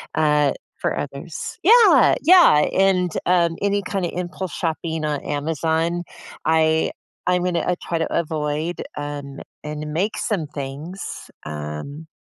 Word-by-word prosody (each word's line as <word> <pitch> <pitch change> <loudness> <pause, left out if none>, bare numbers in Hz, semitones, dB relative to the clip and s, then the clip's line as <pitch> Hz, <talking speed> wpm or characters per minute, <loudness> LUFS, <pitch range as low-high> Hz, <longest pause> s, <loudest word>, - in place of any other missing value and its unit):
uh, 150 -2 +3 0.2
for - - -1
others. - - -6
Yeah. 430 - +7
Yeah. 340 - +7
And, 185 -2 +2
um, 170 -2 +2
any 200 0 +1
kind 190 -1 -2
of - - -3
impulse 180 +1 -4
shopping 160 -1 -2
on 150 -2 -1
Amazon, 160 +3 -1 0.4
I 160 0 +3 0.4
I'm 180 0 +2
gonna 180 -2 0
I 180 - +2
try 170 -2 -1
to 165 - -2
avoid, 155 0 -2 0.2
um, 145 -1 -6 0.2
and 150 0 -5
make 195 +7 -1
some 175 -9 -1
things, 150 +6 -7 0.2
um, 75 - -6
160 Hz, 135 wpm, -22 LUFS, 150-180 Hz, 0.4 s, Yeah